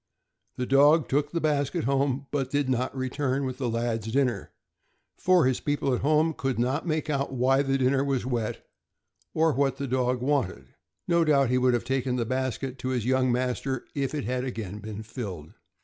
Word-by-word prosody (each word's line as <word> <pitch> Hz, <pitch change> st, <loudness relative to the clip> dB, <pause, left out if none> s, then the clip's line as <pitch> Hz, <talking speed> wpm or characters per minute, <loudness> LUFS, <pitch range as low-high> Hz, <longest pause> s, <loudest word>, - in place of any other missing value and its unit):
The 125 Hz, -, -1 dB
dog 145 Hz, +3 st, +5 dB
took 145 Hz, +2 st, +1 dB
the 170 Hz, -, -1 dB
basket 145 Hz, -3 st, 0 dB
home, 135 Hz, +1 st, 0 dB
but 135 Hz, -3 st, -1 dB
did 145 Hz, 0 st, 0 dB
not 130 Hz, +1 st, -1 dB
return 130 Hz, +1 st, -1 dB
with 130 Hz, 0 st, -5 dB
the 125 Hz, -3 st, -1 dB
lad's 115 Hz, -1 st, -2 dB
dinner, 125 Hz, -6 st, 0 dB, 0.7 s
for 185 Hz, -4 st, +4 dB
his 130 Hz, -1 st, +1 dB
people 145 Hz, -2 st, 0 dB
at 125 Hz, -, -1 dB
home 155 Hz, +2 st, +3 dB
could 135 Hz, -4 st, -2 dB
not 130 Hz, +8 st, 0 dB
make 155 Hz, -2 st, -1 dB
out 140 Hz, -2 st, -1 dB
why 130 Hz, +2 st, +3 dB
the 135 Hz, -1 st, +1 dB
dinner 135 Hz, +1 st, +2 dB
was 135 Hz, -4 st, -1 dB
wet, 120 Hz, -4 st, -3 dB, 0.7 s
or 160 Hz, -1 st, +3 dB
what 135 Hz, -1 st, +1 dB
the 140 Hz, -, -3 dB
dog 125 Hz, -1 st, 0 dB
wanted. 115 Hz, -, -1 dB, 0.3 s
No 170 Hz, -1 st, +3 dB
doubt 140 Hz, -5 st, +3 dB
he 125 Hz, -, +3 dB
would 125 Hz, -1 st, +3 dB
have 120 Hz, -1 st, -2 dB
taken 130 Hz, 0 st, 0 dB
the 120 Hz, -2 st, -1 dB
basket 130 Hz, +1 st, -3 dB
to 130 Hz, -, -3 dB
his 125 Hz, -4 st, -1 dB
young 130 Hz, 0 st, +2 dB
master 125 Hz, +1 st, -1 dB
if 140 Hz, 0 st, -2 dB
it 145 Hz, -, -2 dB
had 125 Hz, +2 st, -2 dB
again 110 Hz, -6 st, -5 dB
been 110 Hz, 0 st, -7 dB
filled. 100 Hz, -, -7 dB
130 Hz, 195 wpm, -27 LUFS, 125-140 Hz, 0.7 s, dog